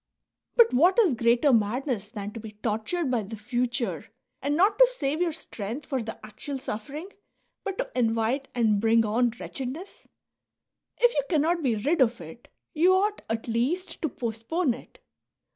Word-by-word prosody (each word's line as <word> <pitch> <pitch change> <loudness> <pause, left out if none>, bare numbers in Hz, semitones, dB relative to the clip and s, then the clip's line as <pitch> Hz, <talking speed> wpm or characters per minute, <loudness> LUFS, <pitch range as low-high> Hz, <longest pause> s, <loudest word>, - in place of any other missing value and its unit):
But 470 -1 +6
what 345 +9 +5
is 410 - +5
greater 240 +4 +3
madness 230 0 0
than 205 -2 -6
to 230 - -6
be 215 -1 -9
tortured 245 +8 -1
by 240 -3 +1
the 210 +2 -7
future 240 +2 -2 0.3
and 290 +1 0
not 405 +5 +3
to - - +9
save 305 - -2
your 350 -2 +2
strength 245 -3 -6
for 265 -3 -2
the 225 0 -6
actual 270 +6 -6
suffering, 275 - -6 0.5
but 390 -2 -4
to - - -3
invite 230 +3 +1
and 215 -4 +2
bring 225 0 +4
on 235 +3 +2
wretched 260 -2 -5
ness? 335 +9 -9 0.9
If 485 -1 +4
you 285 - +2
cannot 330 +1 +2
be 250 -6 +1
rid 285 +9 +1
of 235 -2 +3
it, 165 +8 -11 0.3
you 355 +4 +5
ought 410 +2 +1
at 225 +1 -2
least 255 +11 -1
to 315 - 0
postpone 240 +6 -1
it. 255 - -13
250 Hz, 170 wpm, -27 LUFS, 225-325 Hz, 0.9 s, to